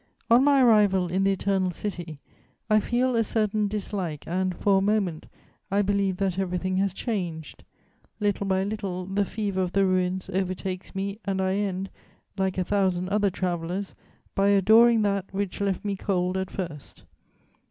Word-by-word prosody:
On 240 +3 +7
my 280 -2 +5
arrival 200 -6 +4
in 190 +2 +1
the 195 - +4
Eternal 195 -1 0
City, 175 -4 -5 0.5
I 215 - +6
feel 245 +3 0
a 230 - +3
certain 215 -1 0
dislike 195 -6 -4
and, 185 +1 -1
for 195 -1 +3
a - - -1
moment, 195 -5 0 0.4
I 200 +1 +2
believe 200 -2 0
that 190 -1 -1
everything 185 0 -1
has 195 0 +1
changed; 175 - -4 0.6
little 205 -1 0
by 190 0 +1
little, 195 -3 -4
the 195 +2 0
fever 200 -2 -2
of 180 -1 -2
the 195 0 +3
ruins 185 0 0
overtakes 185 0 -3
me 200 +2 -3
and 195 -1 -1
I 190 0 +1
end, 195 -2 -2 0.4
like 190 -2 -1
a 185 - +1
thousand 185 -2 0
other 205 0 +2
travellers, 180 +1 -3 0.4
by 195 0 +2
adoring 220 +3 +5
that 200 -2 -1
which 195 0 -3
left 200 0 -1
me 200 -1 -1
cold 185 -2 -1
at 190 0 -2
first. 165 -7 -7
195 Hz, 165 wpm, -26 LUFS, 185-205 Hz, 0.6 s, On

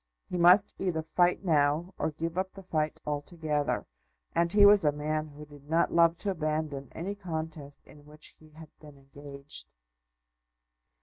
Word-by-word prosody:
He - - -3
must 180 +4 +5
either 170 -4 -1
fight 175 +3 +1
now, 155 +2 +2
or - - 0
give 165 +2 -5
up 190 +1 -2
the 195 - -11
fight 155 -4 -2
altogether; 150 0 -2 0.5
and 170 0 +1
he 205 +1 +6
was 205 -2 +7
a 150 - +4
man 155 +1 -2
who 150 0 -12
did 145 -1 -16
not 165 +1 +2
love 170 0 +4
to 200 - +1
abandon 155 -5 -3
any 185 +5 -4
contest 160 -7 -6
in 145 0 -17
which 150 +1 -11
he 155 - -18
had 155 0 -13
been 150 -2 -14
engaged. 140 +1 -8
155 Hz, 165 wpm, -29 LUFS, 150-175 Hz, 0.5 s, was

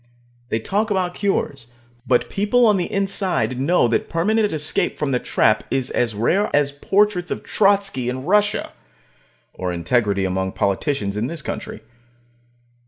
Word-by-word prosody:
They - - 0
talk 205 - -1
about 185 -3 0
cures, 145 - -2 0.4
but 125 -1 +2
people 210 +5 +2
on 210 -3 +4
the 180 - -2
inside 195 -9 -1
know 145 -2 +3
that 115 - 0
permanent 210 +5 +1
escape 155 -1 0
from 145 -2 -1
the 125 - +1
trap 110 -2 +2
is 130 -1 -1
as 115 -3 0
rare 180 - +1
as 145 -1 +2
portraits 185 +4 +1
of - - -4
Trotsky 195 - +1
in 130 +2 -5
Russia. 210 +3 +1 0.8
Or 90 -1 -3
integrity 100 +3 0
among 95 0 -2
politicians 100 +1 -1
in 110 +3 -1
this 160 -1 -6
country. - - -6
150 Hz, 150 wpm, -21 LUFS, -, 0.8 s, on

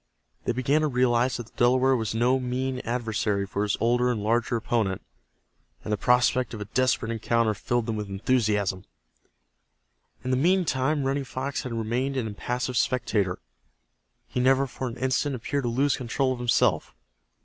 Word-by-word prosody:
They - - +1
began 130 +5 +1
to 155 - +2
realize 125 -1 +2
that 120 - -6
the 115 - -21
Delaware 130 +2 +4
was 110 -2 -2
no 125 +3 +3
mean 130 +1 -2
adversary 110 -4 -1
for 100 +1 -3
his 105 -1 0
older 120 +2 +2
and 110 -4 -1
larger 115 +2 +1
opponent, 110 -4 -1 0.8
and 105 - -2
the - - +3
prospect 125 +2 +2
of - - -7
a - - -4
desperate 120 +1 0
encounter 115 0 +1
filled 120 +3 -1
them 110 -1 -2
with 105 -1 -5
enthusiasm. 100 -3 0 1.4
In 130 - -2
the 130 - +2
meantime 155 -3 +2
Running 135 +1 0
Fox 135 +1 -4
had 125 - -5
remained 120 +5 -1
an 125 - -1
impassive 125 +4 -3
spectator. 105 -7 0 0.9
He - - -3
never 135 +2 +4
for 130 0 -5
an 120 - -6
instant 130 +2 0
appeared 135 +3 -2
to - - +1
lose 135 +4 +2
control 130 +2 0
of 125 - -7
himself. 120 -1 +1
125 Hz, 170 wpm, -26 LUFS, 115-130 Hz, 1.4 s, Delaware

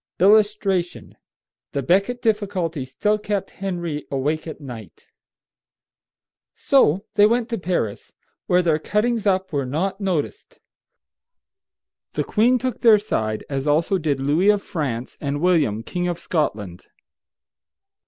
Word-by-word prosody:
[Illustration: 200 -2 +2 0.6
THE 140 - -1
BECKET 200 - +1
DIFFICULTY 190 - -1
STILL 210 +11 0
KEPT 205 -2 -3
HENRY 175 -6 -4
AWAKE 150 +4 -2
AT 160 - -7
NIGHT.] 120 - -10 1.5
So 200 - +3
they 210 -1 +6
went 235 +1 0
to 230 - -2
Paris, 175 - -3 0.4
where 180 0 +3
their 160 -3 +2
cuttings 215 +5 0
up 190 -2 0
were 140 -3 -1
not 190 +9 -2
noticed. 190 - -3 1.6
The - - -1
queen 240 +4 +3
took 255 -2 -4
their 225 -3 +7
side, 110 - -2
as 135 0 -3
also 165 +6 +2
did 150 -4 -1
Louis 150 +9 +2
of 205 -1 +3
France 130 -8 -4
and 145 0 -2
William, 155 - +2
King 180 +5 -3
of 175 -1 -2
Scotland. 105 - -3
180 Hz, 125 wpm, -22 LUFS, 145-210 Hz, 1.6 s, their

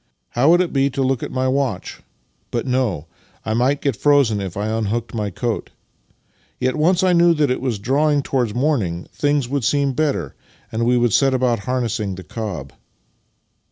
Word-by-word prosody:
" - - -51
How 130 +5 +2
would 175 +2 +6
it 180 - -2
be 135 0 +2
to 135 0 -1
look 130 -2 0
at - - -5
my 130 0 0
watch? 130 -8 -2 0.5
But 120 0 -2
no; 125 - 0 0.4
I 110 - -1
might 130 +5 +1
get 140 -5 0
frozen 135 -6 +3
if 95 -1 -5
I 105 - -1
unhooked 110 +1 -2
my 105 -3 -2
coat. 115 +3 -3 0.9
Yet, 130 0 0
once 175 +4 +2
I 185 -1 +4
knew 170 0 +5
that 150 -4 +2
it 130 - -1
was 125 -5 -1
drawing 140 +6 +1
towards 125 -7 -1
morning, 115 - 0
things 145 -3 +1
would 140 0 -2
seem 140 +2 +1
better, 135 - -1 0.4
and 115 +1 -1
we 125 0 +3
would 120 -3 +2
set 135 -2 +3
about 125 -3 +1
harnessing 115 -6 -1
the 95 - -9
cob." 90 - -6
125 Hz, 190 wpm, -20 LUFS, 110-140 Hz, 0.9 s, would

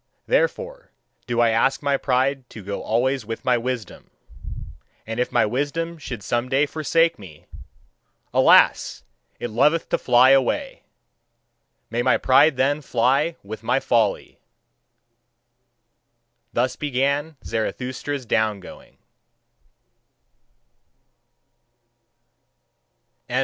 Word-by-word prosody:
Therefore - - -1 0.4
do 120 -1 0
I 120 - +4
ask 135 +5 +1
my 140 -1 +2
pride 130 -1 0
to 105 - -11
go 100 +1 -5
always 130 +3 0
with 115 +4 -7
my 125 -1 +3
wisdom! 120 -4 -5 1.0
And 115 +1 -5
if 125 - -1
my 120 - +3
wisdom 145 +8 -3
should 120 -8 -7
some 120 +3 -2
day 135 +3 +2
forsake 165 +1 +1
me: 85 -7 -14 0.9
alas! - - +4 0.4
it 120 - -5
loveth 150 +8 +2
to - - 0
fly 125 +1 +5
away! 135 - +1 1.1
may 120 +1 0
my - - +3
pride 135 +2 +4
then 145 +3 +1
fly 135 +6 +1
with 105 +2 -8
my 125 +4 +1
folly!" 115 -6 0 2.1
Thus 125 +1 0
began 145 +2 -1
Zarathustra's 130 +4 -4
down 110 -2 0
going. 95 - -14
130 Hz, 100 wpm, -22 LUFS, 115-145 Hz, 2.1 s, fly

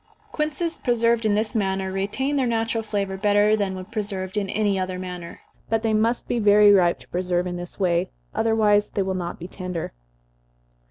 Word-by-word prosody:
Quinces 310 +2 -2
preserved 235 -2 +2
in 205 - +2
this 215 +3 -1
manner 190 -2 0
retain 205 +9 -1
their 265 -3 +1
natural 225 0 0
flavor 200 -3 -3
better 205 +1 +3
than 200 -3 -1
when 185 0 -7
preserved 195 -2 -4
in 200 -2 -1
any 205 -2 +1
other 185 0 -3
manner, 180 -2 -7 0.3
but 225 0 0
they 220 -1 +1
must 225 +3 +1
be 240 - 0
very 210 -1 +6
ripe 180 -3 +4
to - - -17
preserve 180 0 -1
in 180 -1 -3
this 175 +2 -8
way, 180 -1 +1 0.2
otherwise 215 -2 +2
they 200 - -1
will 190 0 -2
not 175 -2 -4
be 175 - -8
tender. 180 -3 -5
205 Hz, 185 wpm, -24 LUFS, 185-225 Hz, 0.3 s, very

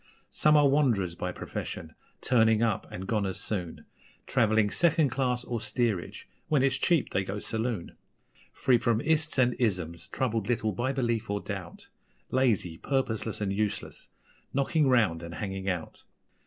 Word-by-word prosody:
Some 150 0 +4
are 145 -1 +6
wanderers 120 - +2
by 90 +1 -3
profession, - - -6 0.3
'turning 110 -2 +4
up' 110 -3 0
and 95 - -6
gone 105 -1 0
as 95 0 -3
soon, 90 -5 -3 0.4
Travelling 110 -2 +2
second 160 -4 +3
class, 125 -1 0
or 120 -3 -3
steerage 115 -9 -2 0.2
(when 150 -4 +2
it's 135 0 +2
cheap 170 0 +2
they 95 - +1
go 95 +2 -4
saloon); 110 -3 -3 0.6
Free 125 -2 +2
from 115 -2 +1
'ists' 155 +2 +1
and 125 -1 +4
'isms', 90 -8 -1
troubled 115 -5 -1
little 115 -3 0
by 120 +7 -1
belief 120 -5 -1
or 100 0 0
doubt 95 -4 -7 0.4
Lazy, 110 -10 +1
purposeless, 115 -6 -1
and 100 -1 0
useless 105 0 -3 0.5
knocking 140 +2 +2
round 105 -10 +3
and 85 0 -7
hanging 95 -1 -3
out. 90 -4 -4
110 Hz, 155 wpm, -28 LUFS, 95-130 Hz, 0.6 s, are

